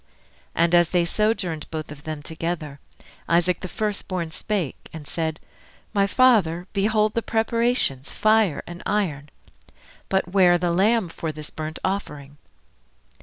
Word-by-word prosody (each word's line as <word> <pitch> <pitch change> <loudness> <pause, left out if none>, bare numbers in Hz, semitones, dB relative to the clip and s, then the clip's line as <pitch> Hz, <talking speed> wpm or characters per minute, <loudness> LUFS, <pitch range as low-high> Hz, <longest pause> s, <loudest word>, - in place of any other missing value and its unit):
And 170 +1 +2
as 175 -1 +5
they 175 -2 +2
sojourned 190 -5 -1
both 155 -1 -5
of 145 -1 -11
them 155 -2 -5
together, 160 -3 -4 0.5
Isaac 175 +1 +2
the 185 - -5
first 210 +1 -3
born 175 -4 -3
spake 180 - -3
and 155 -3 -9
said, 160 -2 -2 0.5
My 200 -2 +3
Father, 200 -8 +3
Behold 215 +1 +2
the 230 - 0
preparations, 225 - +1
fire 215 -6 +2
and 175 +1 -9
iron, 155 -9 -1 0.8
But 190 -2 +1
where 180 -2 +5
the 175 0 0
lamb 200 +2 +2
for 165 -1 -4
this 155 0 -9
burnt 155 0 -5
offering? 150 -7 -4
175 Hz, 140 wpm, -24 LUFS, 160-210 Hz, 0.8 s, as